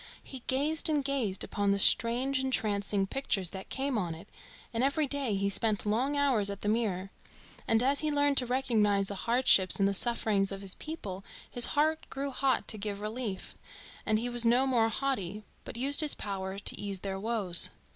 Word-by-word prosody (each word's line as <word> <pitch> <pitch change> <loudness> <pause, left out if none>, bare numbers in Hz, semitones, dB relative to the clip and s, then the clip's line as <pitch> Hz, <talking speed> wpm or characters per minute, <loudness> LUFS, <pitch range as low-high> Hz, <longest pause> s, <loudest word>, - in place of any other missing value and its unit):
He 265 - -9
gazed 300 +5 0
and 295 -3 0
gazed 245 -9 0
upon 205 -1 -1
the 200 - +2
strange 245 +6 +2
entrancing 205 -6 0
pictures 195 -6 -1
that 190 -1 -8
came 270 -3 -1
on 170 -4 -3
it, 165 - -13 0.5
and 230 +2 0
every 285 +3 +1
day 275 -6 -2
he 195 0 0
spent 205 +1 +1
long 250 +8 0
hours 255 -8 +2
at 200 0 -6
the - - -2
mirror. 200 -4 -1 0.6
And 225 +1 +3
as 275 +2 +2
he 310 - 0
learned 285 -1 +1
to 250 - 0
recognise 215 -6 +1
the - - -4 0.2
hardships 235 -6 +4
and 195 - +3
the 200 - 0
sufferings 205 -2 +1
of 195 0 -6
his 195 -1 0
people 200 - -7 0.2
his 245 - +2
heart 315 +2 +1
grew 275 +1 -4
hot 270 0 0
to 215 - -1
give 200 -1 -4
relief, 215 -1 -5 0.5
and 215 - +1
he 235 +3 -2
was 240 -1 0
no 240 +3 +3
more 235 -4 +2
haughty, 215 -6 -3 0.2
but - - -8
used 275 +5 +2
his 300 -2 +4
power 195 -1 -5
to 200 - -3
ease 200 -2 -5
their 195 -1 -4
woes. 205 -5 +5
225 Hz, 195 wpm, -30 LUFS, 200-270 Hz, 0.6 s, woes